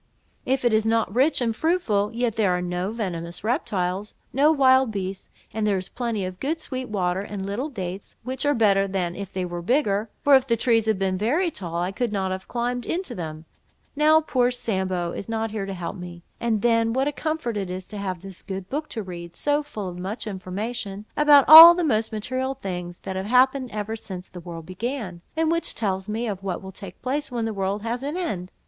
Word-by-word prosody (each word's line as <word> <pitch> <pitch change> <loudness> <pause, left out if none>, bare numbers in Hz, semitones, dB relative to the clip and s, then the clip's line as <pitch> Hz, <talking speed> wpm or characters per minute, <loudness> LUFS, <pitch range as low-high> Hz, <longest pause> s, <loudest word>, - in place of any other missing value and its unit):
If 265 0 +1
it 240 - +3
is 220 0 +2
not 225 -3 +1
rich 265 +4 +3
and 230 -2 0
fruitful, 225 - +1
yet 235 -1 -1
there 215 -4 +2
are - - -2
no 180 +1 -2
venomous 175 -7 -4
reptiles, 205 - -1 0.2
no 285 +5 +5
wild 260 -4 +4
beasts, 190 -1 -5 0.2
and 215 0 0
there 200 -2 +2
is 185 0 -5
plenty 230 -5 -2
of 185 0 -7
good 315 +4 -1
sweet 255 -5 -5
water, 185 -3 0
and 200 -1 -5
little 220 +10 -3
dates, 190 -6 -6
which 260 +2 -2
are 290 0 +2
better 200 -4 +3
than 180 -3 -2
if 200 0 -6
they 185 -1 -2
were 175 -1 -5
bigger; 210 - +1
for 290 -2 +5
if 265 0 +3
the 230 -2 +2
trees 225 -1 +2
had 220 -2 +2
been 190 -1 -1
very 310 - +1
tall, 170 - -5
I 175 +2 -1
could 235 +3 -2
never 195 -2 -1
have 190 0 -5
climbed 245 0 -2
into 350 -6 -2
them, 160 -5 -6 0.5
now 310 +2 +5
poor 250 -5 +2
Sambo 190 -8 -1
is 200 - -7
not 225 -1 -2
here 205 -3 -3
to 195 - -4
help 175 -2 -5
me—and 180 +5 -4
then, 230 -1 +3
what 265 +2 +1
a - - +1
comfort 310 -6 -3
it 195 -3 -3
is 185 0 -5
to 210 - -6
have 185 -3 -4
this 195 -2 -9
good 190 -1 -6
book 300 +3 -3
to 220 - -4
read, 170 -2 -8
full 290 0 +1
of 295 - -8
so 200 -9 -5
much 200 +6 -4
information, 205 +1 -5
about 295 -2 +6
all 330 +3 +13
the 355 - 0
most 225 -7 +1
material 255 +5 -2
things 180 -7 -5
that 190 - -5
have 190 +1 -3
happened 255 +2 +3
ever 215 +1 -4
since 190 -4 -8
the 180 - -9
world 165 -2 -8
began, 185 - -4 0.2
and 320 0 +2
which 335 0 0
tells 190 -2 -2
me 225 +3 -2
of 200 -4 -4
what 190 -3 -3
will 190 - -8
take 190 -1 -10
place 285 +4 -1
when 240 -3 -2
the 225 - -2
world 195 +1 -2
has 235 +2 -2
an 290 +5 -3
end! 190 - -3
215 Hz, 220 wpm, -24 LUFS, 190-255 Hz, 0.5 s, all